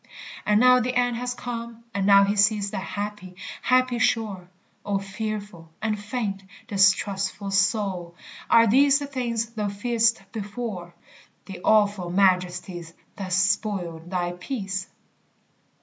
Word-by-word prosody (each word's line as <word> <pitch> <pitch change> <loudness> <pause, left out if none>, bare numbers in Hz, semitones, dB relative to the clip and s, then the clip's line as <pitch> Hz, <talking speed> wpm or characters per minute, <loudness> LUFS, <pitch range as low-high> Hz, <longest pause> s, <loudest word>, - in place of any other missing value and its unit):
And 210 0 +4
now 250 +1 +6
the 250 +1 -2
end 245 -1 +2
has 245 +1 -3
come, 235 -1 -6
and 200 -1 0
now 200 -1 +7
he 200 +1 +1
sees 205 0 +2
The 205 - -3
happy, 205 -1 -6 0.3
happy 255 -1 +2
shore; 210 -6 0 0.3
O 200 -1 -1
fearful, 200 -3 -6
and 215 -1 -1
faint, 210 -3 -3 0.3
distrustful 195 -1 +1
soul, 190 -3 0 0.3
are 230 0 +6
these 275 +6 +5
The 285 - -4
things 235 -4 -2
thou 215 -3 -2
fearedst 225 +1 +1
before 205 -5 -6 0.5
The 190 -3 -9
awful 205 -4 +3
majesties 180 -2 0 0.2
that 190 -2 -5
spoiled 185 -3 0
thy 175 -1 -1
peace? 195 0 -4
205 Hz, 130 wpm, -25 LUFS, 190-230 Hz, 0.5 s, now